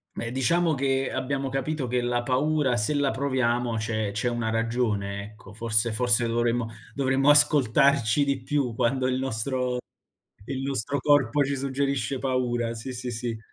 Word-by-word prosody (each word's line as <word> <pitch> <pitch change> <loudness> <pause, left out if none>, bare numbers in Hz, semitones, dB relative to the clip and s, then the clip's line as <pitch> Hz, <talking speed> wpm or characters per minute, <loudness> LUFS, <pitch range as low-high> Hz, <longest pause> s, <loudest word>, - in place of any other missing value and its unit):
Beh, 115 0 -4
diciamo 160 +6 +2
che 135 -1 0
abbiamo 135 +1 -2
capito 135 +2 -2
che 125 0 0
la 120 0 -1
paura, 135 +1 +1
se 120 +6 0
la 140 -1 +2
proviamo 125 -3 0
c'è 110 -1 -2
c'è 105 +4 -1
una 120 -2 -2
ragione, 110 -3 -1
ecco. 105 -1 -13
Forse 115 +1 0
forse 120 0 +2
dovremmo 120 0 0 0.3
dovremmo 135 0 +2
ascoltarci 140 -2 +4
di 140 -2 -1
più 135 -2 -1
quando 130 +3 0
il 130 0 0
nostro 125 0 -1 0.7
il 135 -1 -4
nostro 135 0 -2
corpo 145 0 +3
ci 140 +1 -2
suggerisce 135 0 -1
paura. 125 -3 -1
Sì, 115 +3 -6
sì, 125 0 -5
sì. 120 -1 -4
125 Hz, 155 wpm, -26 LUFS, 115-140 Hz, 0.7 s, ascoltarci